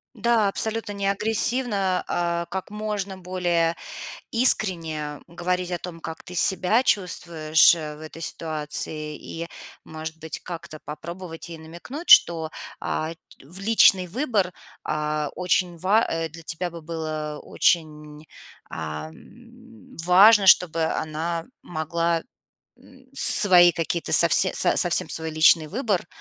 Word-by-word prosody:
Да, 230 -4 +1
абсолютно 220 +1 0
не 200 -1 -3
агрессивно, 210 -2 0
а 170 0 -2
как 190 0 -6
можно 210 -2 -5
более 175 -2 -1 0.5
искренне 165 - +1
говорить 180 +1 -3
о 175 - -2
том, 170 -1 -9
как 160 0 -8
ты 180 - -11
себя 190 +5 +2
чувствуешь, 170 -8 +2
э, 155 -2 -7
в 150 - -15
этой 155 +1 -9
ситуации 155 -1 -4
и, 165 +1 -8 0.4
может 160 0 -8
быть, 160 -1 -6
как-то 170 -3 -9
попробовать 170 +2 -9
ей 165 - -9
намекнуть, 175 - -10
что, 160 -2 +6 0.3
а, 155 +1 -3 0.3
в 170 +7 -13
личный 195 -3 +4
выбор, 210 - -1 0.3
а, 150 -1 -2
очень 180 -1 -1
ва 200 +7 +2
э, 165 0 -2
для 165 +2 -12
тебя 170 +2 -4
бы 170 0 -10
было 155 -2 -5
очень, 150 -2 -1 0.4
ам, 230 - -11
важно, 195 +4 +6
чтобы 165 -3 +4
она 160 +2 -3 0.2
могла, 165 0 -2 0.5
м, 260 0 -20
свои 180 -9 +7
какие-то 165 +1 -3
совсе - - +5
со - - +4
совсем - - +2
свой 160 0 -2
личный 155 0 +4
выбор, 205 - -2
170 Hz, 125 wpm, -23 LUFS, 160-195 Hz, 0.5 s, свои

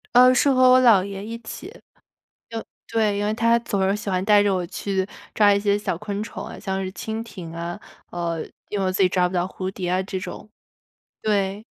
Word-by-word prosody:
呃， 250 +1 +8
是 275 +2 +4
和 255 -1 +5
我 255 0 +7
姥 225 -7 +6
爷 200 0 -6
一 230 +1 -5
起， 230 - -8 0.8
就 225 -1 -4 0.2
对， 215 -3 +1
因 205 - -1
为 210 - +1
他 230 +1 +3
总 205 -4 -2
是 200 - +1
喜 210 -1 -4
欢 185 -1 0
带 210 -1 +6
着 200 -1 +2
我 180 -1 -1
去 190 +1 -2 0.3
抓 205 -1 +5
一 - - +2
些 200 0 +2
小 205 -4 -2
昆 205 +2 -4
虫 205 -2 -6
啊， - - -8
像 190 -1 -2
是 185 - -5
蜻 220 +3 -4
蜓 190 -7 -9
啊， 170 +1 -5 0.3
呃， 170 -2 -2 0.3
因 205 - -3
为 195 - 0
我 185 - +1
自 190 - +1
己 185 - +5
抓 180 -1 +2
不 180 - -4
到 175 0 +1
蝴 185 0 -5
蝶 185 -2 -4
啊 185 +1 +1
这 190 -1 -4
种， 205 - -8 0.7
对。 200 -1 0
200 Hz, 245 characters per minute, -23 LUFS, 185-220 Hz, 0.8 s, 呃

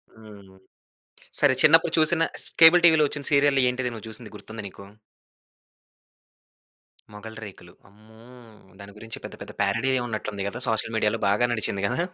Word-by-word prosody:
హ్మ్. 100 -3 -16 0.8
సరే 145 -3 +4
చిన్నప్పుడు 165 +1 +4
చూసిన 160 +1 +3 0.2
ష్ - - -4
కేబుల్ 170 +2 +8
టివిలో 160 -2 +5
వచ్చిన 145 0 -6
సీరియల్ 140 -1 +3
ఏంటిది 125 -1 -3
నువ్వు 110 0 -10
చూసింది 110 -1 -7
గుర్తుందా 110 -1 -10
నీకు? 100 +1 -13 2.3
మొగలిరేకులు. 105 -4 -11 0.2
అమ్మో! 110 +2 -20 0.6
దాని 100 0 -12
గురించి 110 0 -9
పెద్ద - - -9
పెద్ద - - -9
పేరడీయె 115 +6 0
ఉన్నట్లు 110 -2 -5
ఉంది 100 -1 -5
కదా 120 - -8
సోషల్ 110 0 -2
మీడియాలో 110 +1 0
బాగా 105 +5 +2
నడిచింది 100 -3 -3
కదా. - - -3
110 Hz, 145 wpm, -24 LUFS, 105-135 Hz, 2.3 s, కేబుల్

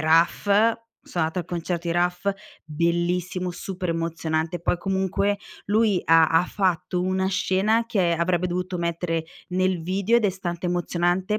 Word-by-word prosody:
Raf, 160 +2 +3 0.6
sono 170 -3 -2
andata 160 +3 -2
al - - -7
concerto 170 0 -3
di 170 - +1
Raf, 180 +3 +1 0.3
bellissimo, 175 +3 -1
super 180 +1 -5
emozionante, 165 0 -2
poi 175 - +1
comunque 190 +2 0 0.3
lui 210 -3 +3
ha 165 -1 +6
ha 165 +3 +3
fatto 180 -2 -1
una 185 +1 0
scena 195 +4 +1
che 195 -7 +1
avrebbe 170 +1 +1
dovuto 180 +1 -3
mettere 170 -1 -2 0.2
nel 185 -1 0
video 195 +6 +1
ed 235 - +1
è - - +2
stante 180 -2 -4
emozionante 175 +3 0
180 Hz, 150 wpm, -24 LUFS, 170-190 Hz, 0.6 s, ha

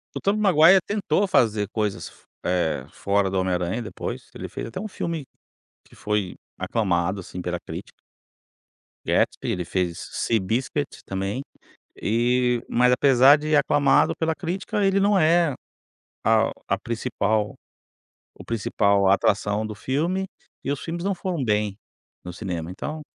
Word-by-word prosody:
O - - -3
Tobey 205 +2 +1
Maguire 185 -2 +6
tentou 205 -2 +1
fazer 110 - +2
coisas 105 -2 -2
f - - -22 0.2
eh, 90 -3 0
fora 100 -1 0
do 95 - -1
Homem 95 0 0
Aranha 90 +6 -1
depois. 110 - -6
Ele - - -6
fez - - -6
até 115 - -6
um 215 - -5
filme 165 -7 -4 0.6
que - - -20
foi 105 -3 -2 0.2
aclamado, 95 -3 0
assim, 90 +1 -7
pela 90 -1 -3
crítica. - - -8 1.1
Gatsby, - - +1
ele 90 - -2
fez 90 -1 -2
Seabiscuit, 115 +7 -1
também 95 +6 -3 0.5
e 120 +2 +1
Mas 125 +1 +4
apesar 135 +2 +6
de 155 +1 0
aclamado 145 -1 +3
pela 160 0 0
crítica 190 +3 -2
ele 195 0 +3
não 200 0 +3
é 165 0 +4 0.7
a - - +3 0.2
a - - +1
principal 110 -2 -1 0.8
o - - -12
principal 100 -3 +2
atração 105 +2 +2
do 105 - -6
filme, 165 - -1 0.4
e - - -1
os 140 - -4
filmes 170 +1 -5
não 200 0 +1
foram 175 -5 -3
bem 105 -3 0 0.5
no 90 - -6
cinema, 90 -3 -5
então, 150 +11 -5
115 Hz, 145 wpm, -24 LUFS, 100-160 Hz, 1.1 s, Maguire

